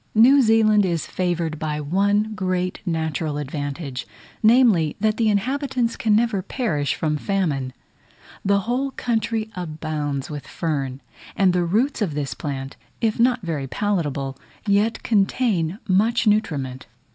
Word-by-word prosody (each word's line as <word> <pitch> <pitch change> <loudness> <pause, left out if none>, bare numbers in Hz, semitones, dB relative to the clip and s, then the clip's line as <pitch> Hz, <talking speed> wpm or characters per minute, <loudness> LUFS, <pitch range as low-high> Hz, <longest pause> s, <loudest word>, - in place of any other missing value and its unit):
New 260 +6 +7
Zealand 220 -3 +4
is 170 -4 -1
favoured 170 -4 -2
by 150 -1 -2
one 200 +7 +1
great 185 -2 -1
natural 160 -2 -1
advantage; 145 -1 -4 0.3
namely, 215 - +4
that 215 +1 +1
the 225 -2 +2
inhabitants 250 +3 0
can 215 -2 +2
never 225 -3 +2
perish 170 - -1
from 150 -2 -1
famine. 150 -8 -1 0.7
The 200 0 +2
whole 250 +6 -1
country 225 -3 -2
abounds 155 -5 -3
with 145 -3 -7
fern: 140 -5 -3 0.3
and 190 -2 +3
the 180 -1 +1
roots 230 +10 +1
of 170 -8 -1
this 140 -5 -2
plant, 135 0 -5 0.2
if 225 -2 0
not 245 -2 +3
very 155 -6 -3
palatable, 140 -5 -2 0.3
yet 210 +2 +1
contain 200 -4 +1
much 220 +5 +2
nutriment. 145 -12 0
185 Hz, 135 wpm, -22 LUFS, 150-220 Hz, 0.7 s, New